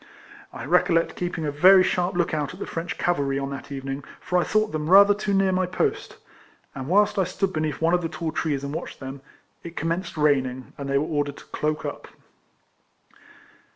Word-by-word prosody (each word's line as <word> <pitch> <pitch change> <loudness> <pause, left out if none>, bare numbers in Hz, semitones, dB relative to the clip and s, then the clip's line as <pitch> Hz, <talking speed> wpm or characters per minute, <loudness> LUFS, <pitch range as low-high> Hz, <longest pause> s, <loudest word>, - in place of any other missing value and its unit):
I - - -7
recollect 165 -1 +2
keeping 175 -3 -3
a 145 - -1
very 185 +6 +7
sharp 180 +1 0
look 175 -2 0
out 150 +2 -2
at - - -15
the - - -4
French 165 +1 -5
cavalry 140 -6 0
on 135 0 -3
that 140 +1 -8
evening, 135 0 -5 0.2
for 180 - 0
I - - +2
thought 215 0 +1
them 155 0 -3
rather 200 +2 +8
too 205 0 -3
near 195 -1 +3
my 185 0 +1
post; 180 - -2 0.6
and 135 -1 -6
whilst 205 +4 +3
I - - +4
stood 190 +2 -2
beneath 155 -2 -2
one 165 +1 +3
of 180 - +3
the 165 - -3
tall 165 -1 -4
trees 145 -4 -2
and 140 +1 -4
watched - - -6
them, 135 0 -7 0.4
it 170 0 -10
com 165 - -1
menced 170 0 -3
raining, 130 -4 +1
and 140 -1 -6
they 140 - +2
were 145 - +1
ordered 145 -2 -2
to - - -13
cloak 150 0 -2
up. - - -6
165 Hz, 210 wpm, -24 LUFS, 140-180 Hz, 0.6 s, rather